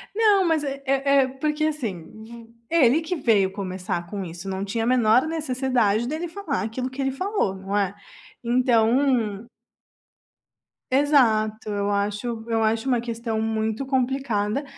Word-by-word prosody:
Não, 415 -4 +4
mas 320 -3 +1
é 275 0 -4
é 275 +1 +2
é, - - -1
porque 300 +3 -2
assim, 235 - -3 0.2
v 230 0 -12 0.2
ele 310 -2 +4
que 350 +3 -3
veio 210 - +2
começar 185 -3 -4
com 200 -1 -5
isso, 175 +3 -8
não 190 +1 -3
tinha 225 +3 -2
a - - -1
menor 250 +2 +4
necessidade 255 -8 0
dele 320 +5 -3
falar 330 - -3
aquilo 250 +4 -3
que 265 +2 -6
ele 270 0 0
falou, 370 - -1
não 195 +1 -5
é? 200 -1 0 0.5
Então 235 -2 +2 1.4
Exato, 225 -7 +2
eu 205 0 -1
acho 210 +3 -2
eu 225 -1 +1
acho 225 +3 0
uma 245 -3 +2
questão 230 -2 -3
muito 220 +3 -1
complicada, 260 -2 -1
235 Hz, 150 wpm, -24 LUFS, 215-275 Hz, 1.4 s, Não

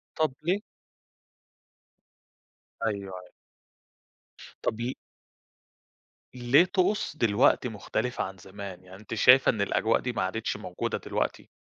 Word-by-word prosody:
طَب 155 -4 +1
ليه؟ 185 +5 +1 2.3
أيوه، 110 -2 +1 0.2
أيوه. 90 - -13 1.4
طَب 110 +1 -1
ل 125 +2 -2 1.4
ليه 125 +7 +4
طقوس 190 -1 0
دلوقتي 115 +2 +3
مُختلفة 115 +3 -2
عن 95 0 -7
زمان؟ 95 0 -9
يعني 90 +1 -13
أنتِ 110 - -8
شايفة 125 +4 +6
إن 105 - +1
الأجواء 110 +2 +2
دي 125 - -3
ما 110 - -2
عادِتش 105 +4 -2
موجودة 90 -4 -3
دلوقتي؟ - - -3
115 Hz, 115 wpm, -28 LUFS, 100-130 Hz, 2.3 s, شايفة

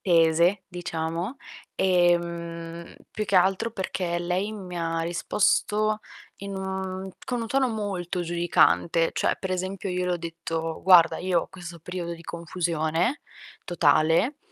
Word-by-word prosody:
tese, 170 +2 +4
diciamo. 170 +4 -4 0.4
Ehm, 170 -2 0 0.2
più 215 - -3
che 195 - +2
altro, 190 +5 +3
perché 185 -4 -2
lei 180 +4 -1
mi 185 -4 -7
ha 165 0 -1
risposto 210 +5 +1 0.4
in 200 0 -6
un, 190 0 -4
mhmm, - - -6 0.2
con 245 -2 -2
un - - -3
tono 265 +2 +2
molto 195 -5 -3
giudicante. 170 -1 +2
Cioè, - - +1
per 190 - -4
esempio 185 +1 -3
io 180 0 -1
le 180 - +1
ho - - 0
detto: 165 -1 -4
"Guarda, 180 -3 +6
io 180 -1 +1
ho - - -10
questo 175 -2 -10
periodo 175 0 -5
di 165 - -13
confusione, 170 - -1 0.5
totale, 165 - +3
175 Hz, 140 wpm, -26 LUFS, 170-190 Hz, 0.5 s, Guarda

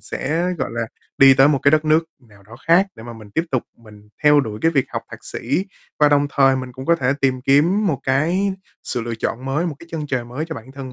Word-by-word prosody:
sẽ, 170 +6 -2
gọi - - -2
là, 115 -1 -2 0.3
đi 135 -1 +8
tới 135 +2 +5
một 140 -2 +2
cái 140 - +5
đất 155 0 +2
nước 155 +2 +3
nào 105 -6 -21
đó 110 +4 -14
khác 175 +4 +5
để - - -12
mà 120 0 -8
mình 110 -2 -13
tiếp 160 +10 -1
tục 130 -3 0
mình 105 -2 -17
theo 150 -1 +6
đuổi 110 -5 -5
cái 165 - +4
việc 135 -5 +1
học - - -4
thạc - - -11
sĩ 190 - -2 0.3
và 150 - +5
đồng 145 0 +3
thời 135 -2 +3
mình 130 -1 -6
cũng 130 +2 -9
có 170 0 +4
thể 130 -2 +1
tìm 130 -2 +1
kiếm 170 +11 +3
một 150 -9 -1
cái 170 +9 +1 0.3
sự 120 - -3
lựa 115 0 -4
chọn 125 +3 -3
mới, 145 +6 -1
một 160 - -3
cái 170 - -14
chân 155 -2 -4
trời 125 -4 -2
mới 125 +6 -5
cho 160 0 -6
bản 115 +4 -11
thân 135 -2 -8
135 Hz, 265 wpm, -20 LUFS, 125-155 Hz, 0.3 s, đi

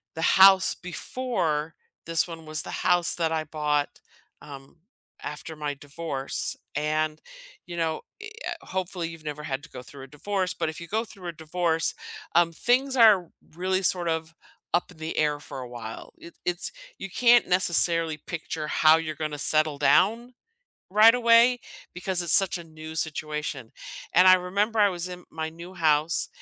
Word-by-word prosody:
the 160 - -5
house 190 +2 +6
before 175 -6 -3 0.3
this 165 0 +1
one 165 -2 -9
was 155 0 -3
the - - -9
house 175 -2 +1
that 165 -2 -1
I 160 -1 -1
bought, 150 -1 -2 0.4
um, 135 +1 -12 0.5
after 150 +2 -7
my 150 -1 -3
divorce. 140 -1 -4 0.2
And, 155 +1 -1 0.4
you 175 -1 -8
know, 160 -1 -1 0.2
e 445 0 -8 0.2
uh, 340 -1 -7
hopefully 185 -2 -3
you've 165 -1 -11
never 150 0 -5
had 140 -2 -4
to 165 - -13
go 125 - -9
through 135 +2 -12
a - - -10
divorce, 185 +6 -2
but - - -2
if 160 - -7
you 170 - -8
go 220 +4 -1
through 195 -5 -11
a - - -3
divorce, 160 0 -1 0.4
um, 170 -1 +4
things 255 +8 +1
are 210 -8 +6 0.3
really 185 +2 0
sort 175 -1 +2
of 160 0 -3 0.4
up 175 - 0
in 180 - -17
the 160 +1 -5
air 150 -1 +1
for 140 - -9
a 125 - -7
while. 115 -2 -9
It 170 - -13
it's, 175 0 -2 0.3
you 195 - -7
can't 240 +3 +4
necessarily 170 -3 +2
picture 155 0 -6
how 155 +1 +5
you're 155 -1 -4
gonna 150 -1 -4
settle 155 0 +1
down 230 - +2 0.6
right 215 +4 +7
away 235 +1 +5 0.4
because 180 0 -1
it's 170 - +2
such 195 -2 +5
a 170 - -9
new 160 0 -10
situation. 150 -5 -3 0.4
And 180 +2 +7
I 185 - +9
remember 200 +5 -1
I 205 -1 +6
was 180 -1 -4
in 180 0 -9
my 160 0 -4
new 170 +3 -11
house 155 -1 +2
165 Hz, 175 wpm, -26 LUFS, 155-185 Hz, 0.6 s, I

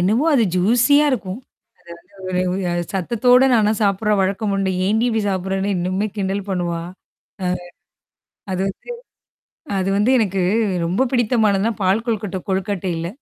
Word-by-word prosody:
என்னமோ 215 - +2
அது 240 -5 +4
ஜூசியா 240 +10 +4
இருக்கும். 205 -4 -3 0.8
அது 200 - -18
வந்து 180 -1 0
ஒரு 195 - -2
ஒரு 175 0 -1
சத்தத்தோட 240 +7 +3
நானா 215 -3 +3
சாப்பிடுறேன் 205 +1 +1
வழக்கம் 200 +2 -1
உண்டு. 195 -1 0 0.2
என்டி 220 +3 +2
இப்டி 225 -1 0
சாப்பிடுறேன்னு 190 +1 -1
இன்னுமே 185 +4 -1
கிண்டல் 195 0 -2
பண்ணுவா? 175 -3 -2 0.6
ஆ. - - 0 1.1
அது 185 - -2
வந்து 195 - -9 0.9
அது 190 0 -1
வந்து 210 +5 +2
எனக்கு 195 -4 0 0.5
ரொம்ப 190 +10 +1
பிடித்தமானதுன்னா, 225 -3 +2
பால் 195 +5 +1
கொழுக்கட்ட 210 -5 -2
கொழுக்கட்டைல. 185 -3 -2
195 Hz, 135 wpm, -20 LUFS, 185-225 Hz, 1.1 s, அது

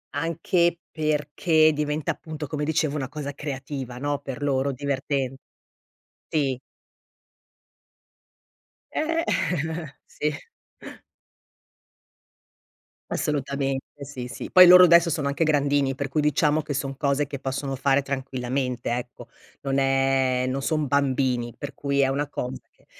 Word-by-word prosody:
anche 170 +2 +1
perché 155 +1 +2
diventa 150 0 -1
appunto 155 -1 -7
come 150 +1 -4
dicevo 155 -1 0
una 135 -2 -3
cosa 145 -1 -5
creativa, 135 -3 -6
no, 145 +1 -2
per 135 +1 -6
loro, 140 -1 +1
diverten 135 0 -2 0.9
sì. 135 -4 0 2.3
Eh, 330 +1 0 0.8
sì. 150 0 -2 2.8
Assolutamente, 140 -1 -2
sì, 130 -3 -7
sì, 115 -1 -7
poi 185 0 +9
loro 180 +1 +10
adesso 170 0 +6
sono 145 -2 -1
anche 140 +4 0
grandini 145 -2 +2
per 135 +1 -3
cui 150 +2 0
diciamo 150 +1 +2
che 145 - -5
son 135 0 -3
cose 140 +1 +1
che 140 +1 -6
possono 135 +1 -3
fare 135 +1 +3
tranquillamente, 130 -2 -3
ecco. 125 0 -8 0.3
Non 135 -1 -1
è 135 -1 +2
non 135 +1 -2
son 155 -1 0
bambini 130 -4 0
per 145 0 -7
cui 140 -1 -1
è 135 - +4
una 140 +2 -1
cosa 125 -1 -5
che - - -31
140 Hz, 125 wpm, -25 LUFS, 135-150 Hz, 2.8 s, loro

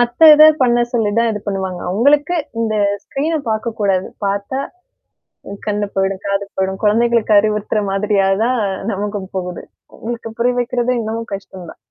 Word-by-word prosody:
மத்த 240 +4 -1
இத 305 +1 +8 0.2
பண்ண 240 -1 +3
சொல்லி 220 -3 +1
தான் 235 - +2
இது 210 - -5
பண்ணுவாங்க. 190 -2 -3
அவங்களுக்கு 290 - +2 0.2
இந்த 220 -1 0 0.3
ஸ்க்ரீன் 310 +4 -2
பாக்கக்கூடாது. 215 -4 -1 0.2
பாத்தா 200 +7 -2 0.9
அ - - -5
கண்ணு 210 0 0
போயிடும், 195 0 -1
காது 200 0 0
போயிடும். 190 0 -2
குழந்தைகளுக்கு 230 0 +3
அறிவுறுத்துற 210 0 -1
மாதிரியா 195 0 +1 0.2
தான் 250 -1 +1 0.3
நமக்கும் 200 -1 -4
போகுது. 180 -1 -5 0.3
அவங்களுக்கு 230 0 -6
புரியா 245 +1 +1
வைக்கிறது 245 +1 -1
இன்னமும் 225 0 -5
கஷ்டம் 190 -3 -8
தான். - - -16
215 Hz, 145 wpm, -17 LUFS, 195-240 Hz, 0.9 s, இத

